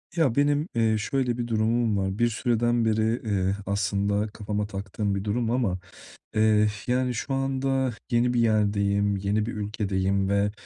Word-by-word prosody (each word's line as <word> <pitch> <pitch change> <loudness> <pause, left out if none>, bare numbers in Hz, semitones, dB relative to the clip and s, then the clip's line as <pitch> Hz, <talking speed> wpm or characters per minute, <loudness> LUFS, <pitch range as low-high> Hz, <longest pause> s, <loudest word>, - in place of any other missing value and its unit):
Ya, 145 -8 +2
benim, 145 +2 +2
eee, 110 -1 +2
şöyle 125 +2 -1
bir 120 -1 -3
durumum 110 -1 +1
var. 95 +1 -1
Bir 120 - +4
süreden 120 0 +1
beri, 110 +2 +1
eee, 100 -2 0
aslında 100 +1 0
kafama 105 -1 -3
taktığım 100 0 -3
bir 100 - -3
durum 115 +2 -1
ama, 115 -7 0 0.6
eee, 110 -1 +4 0.2
yani, 125 0 +1
şu 130 +4 -3
anda 135 -1 0 0.2
yeni 120 +1 +2
bir 120 - +1
yerdeyim, 100 -2 +2
yeni 100 +2 0
bir 120 - -4
ülkedeyim 100 -2 -1
ve, 100 +1 +2
110 Hz, 160 wpm, -26 LUFS, 100-120 Hz, 0.6 s, Bir